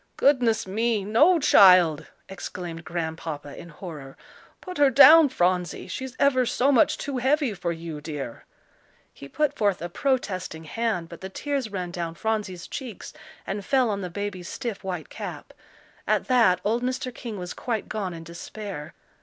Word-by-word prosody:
"Goodness 245 -6 +3
me! 215 +1 0
no, 300 - +5
child!" 180 - +6 0.2
exclaimed 175 -3 -7
Grandpapa, 160 -4 -5
in 170 - -10
horror. 150 -5 -9 0.4
"Put 365 -4 -8
her 285 -1 +6
down, 300 +4 +8
Phronsie; 180 -6 0
she's 260 -1 -6
ever 260 -2 +4
so 255 +3 +2
much 250 - +4
too 275 -3 -3
heavy 270 -1 +1
for 175 -2 -3
you, 165 -2 -6
dear." 145 -6 -6 0.7
He 140 - -11
put 295 - 0
forth 200 -6 +1
a 175 - -5
protesting 185 - -2
hand, 180 +1 -2
but 170 0 -11
the 190 - -6
tears 275 +1 -3
ran 180 -3 -4
down 170 -2 -4
Phronsie's 210 -4 -3
cheeks 245 -7 -7 0.3
and 200 +1 -4
fell 255 +1 +2
on 200 -1 -3
the 180 - -4
baby's 185 -1 -5
stiff 235 -7 -5
white 180 -4 -5
cap. - - -8 0.5
At - - +1
that 230 -8 +4
old 225 +4 0
Mr. 255 0 -3
King 230 -3 -7
was 180 -1 -6
quite 225 -4 -3
gone 195 -5 -4
in 165 - -9
despair. 170 0 -8
195 Hz, 160 wpm, -25 LUFS, 170-250 Hz, 0.7 s, down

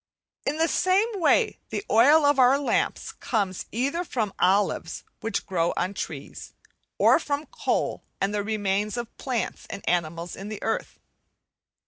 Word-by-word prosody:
In 295 - 0
the 325 +1 +3
same 375 +6 +2
way 435 +6 +3
the 405 - -4
oil 290 +7 +6
of 285 -1 +4
our 255 +2 +6
lamps 280 - -1
comes 200 -7 -2
either 275 +9 -1
from 220 - -2
olives, 195 +3 +1 0.2
which 225 - -2
grow 170 -3 0
on 185 +3 -1
trees; - - -7 0.4
or - - +5
from 290 +1 -2
coal - - -2 0.2
and 195 +1 0
the 205 - 0
remains 205 0 -1
of 240 -1 -5
plants 250 -4 -3
and 200 - -8
animals 170 0 -1
in 195 +2 -7
the 215 - -5
earth. 225 - -2
225 Hz, 150 wpm, -26 LUFS, 195-285 Hz, 0.4 s, oil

